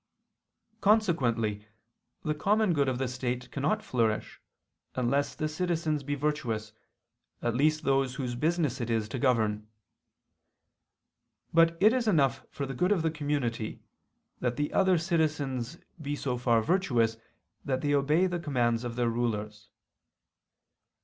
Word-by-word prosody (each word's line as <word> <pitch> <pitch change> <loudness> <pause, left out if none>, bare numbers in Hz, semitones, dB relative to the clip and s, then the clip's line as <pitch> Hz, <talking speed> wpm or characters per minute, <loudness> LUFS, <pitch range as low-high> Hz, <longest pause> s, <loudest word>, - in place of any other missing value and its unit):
Consequently 120 - +2 0.6
the 155 - 0
common 205 +5 +2
good 140 -3 +2
of 130 - -1
the 130 0 -1
state 125 0 -3
cannot 155 +10 0
flourish, 115 -3 -1 0.5
unless 130 +3 0
the 155 - -1
citizens 160 -2 -1
be 145 +1 -2
virtuous, 125 -7 -2 0.7
at 120 - +1
least 155 +5 +2
those 135 -2 +1
whose 125 -3 -3
business 150 -1 0
it 120 - -3
is 110 -2 0
to 120 +4 -5
govern. 110 -4 +1 1.9
But 165 0 +5
it 215 +4 +6
is 250 -3 0
enough 140 - +2
for 140 - -4
the 135 - -5
good 180 +9 +1
of 185 -6 +2
the 160 - +1
community, 145 -8 -2 0.6
that 120 -1 -1
the 145 +3 -2
other 190 -2 +4
citizens 155 -5 -1 0.2
be 145 0 -2
so 130 -3 -2
far 120 -2 +2
virtuous 120 - +1 0.5
that 130 -2 -1
they 145 0 +1
obey 150 +6 +3
the 175 -1 -1
commands 120 -7 0
of 120 -1 -4
their 120 -1 +1
rulers. 105 -3 -2
135 Hz, 140 wpm, -29 LUFS, 120-160 Hz, 1.9 s, it